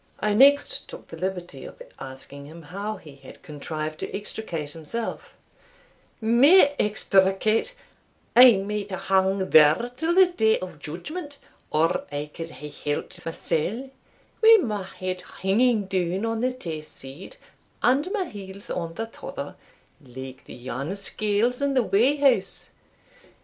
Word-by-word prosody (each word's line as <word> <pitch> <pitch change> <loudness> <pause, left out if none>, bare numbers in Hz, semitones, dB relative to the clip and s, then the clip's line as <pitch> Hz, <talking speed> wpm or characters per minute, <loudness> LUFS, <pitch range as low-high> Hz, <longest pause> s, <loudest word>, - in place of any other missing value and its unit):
I 210 -1 +1
next 280 +6 +4
took - - -11
the - - -8
liberty 180 -5 -5
of - - -11 0.2
asking 135 +1 -9
him 165 +2 -12
how 200 +7 -5
he 145 -3 -14
had 135 -1 -15
contrived 155 +1 -5
to - - -5
extricate 175 -8 -4
himself. 165 +10 -5 0.8
"Me 275 +9 +6
extricate! 210 - +2 0.6
I 250 0 +10
might 205 +1 -3
hae 190 - -3
hung 190 0 +1
there 155 +10 +6
till 320 +6 0
the 380 0 +8
day 220 -12 +2
of 180 -5 -8
judgment 285 - -7 0.3
or 160 +2 +1
I 145 +1 -4
could 165 -1 -6
hae 150 -2 -9 0.2
helped 145 - -5
mysell, 185 - -2 0.5
wi' 450 0 +9
my 210 -4 -2
head 185 -1 -5 0.2
hinging 215 +2 +2
down 185 +1 -1
on 225 0 -2
the 255 +1 +1
tae 170 -12 -6
side, 150 - -11 0.5
and 275 +8 +3
my 400 -3 -1
heels 200 - -8
on 165 -1 -4
the 225 - -3
tother, 485 - -8 0.5
like 130 +1 -10
the - - -10
yarn 130 +8 -5
scales 215 +5 -1
in 280 -1 +1
the 255 - +4
weigh 235 +8 +3
house. 280 -2 +1
195 Hz, 145 wpm, -25 LUFS, 160-240 Hz, 0.8 s, I